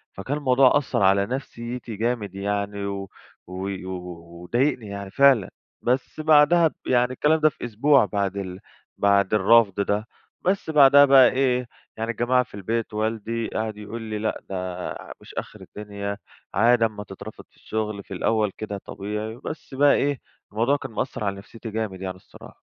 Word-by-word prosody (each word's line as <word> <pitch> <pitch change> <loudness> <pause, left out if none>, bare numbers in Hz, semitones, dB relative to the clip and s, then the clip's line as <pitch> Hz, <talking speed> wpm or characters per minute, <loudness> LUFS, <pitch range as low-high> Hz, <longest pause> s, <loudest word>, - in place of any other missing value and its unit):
فكان 130 +10 -3
الموضوع 130 -1 +4
أثر 130 -8 -1
على 100 +1 +4
نفسيتي 120 -2 -5
جامد 110 -3 -2
يعني 100 0 -2
و 100 -1 -4 0.4
و 95 +2 -5 0.7
وضايقني 120 +2 0
يعني 100 -1 -7
فعلًا. 135 -6 +4 0.3
بس 130 +5 -1
بعدها 155 +2 +5
ب - - -6
يعني 125 0 +3
الكلام 155 +4 +2
ده 155 0 +5
في 125 - -8
أسبوع 120 +2 +4
بعد 100 0 -2
ال 95 -1 -5 0.4
بعد 100 0 +3
الرفض 105 -1 +4
ده. 105 +2 -1 0.3
بس 190 -2 0
بعدها 145 -1 +7
بقى 135 -3 +7
إيه 125 -2 +1 0.3
يعني 115 +1 -2
الجماعة 125 +2 +2
في - - -23
البيت، 110 +3 -3
والدي 110 +1 -2
قعد 110 -1 -3
يقول 105 +2 -7
لي: 110 -1 -4
"لأ، 110 0 -2
ده 95 - -4 0.4
ع - - -9
مش - - -13
آخر - - -6
الدنيا، 100 -1 -6 0.4
عادي 115 +3 +4
أمّا 105 -2 -4
تترفض 100 +2 -10
في - - -32
الشُغل، 105 -2 -4
في - - -10
الأول 105 +2 +1
كده 105 -2 -5
طبيعي." 105 +3 -5
بس 150 - -7
بقى 145 +1 +5
إيه 140 -2 0 0.3
الموضوع 120 +7 +2
كان 130 -4 -8
مأثر 110 -1 -3
على 100 -1 -1
نفسيتي 110 +3 -10
جامد، 105 -4 -4
يعني 95 -1 -4
الصراحة. 95 - -16
110 Hz, 165 wpm, -24 LUFS, 100-130 Hz, 0.7 s, بعدها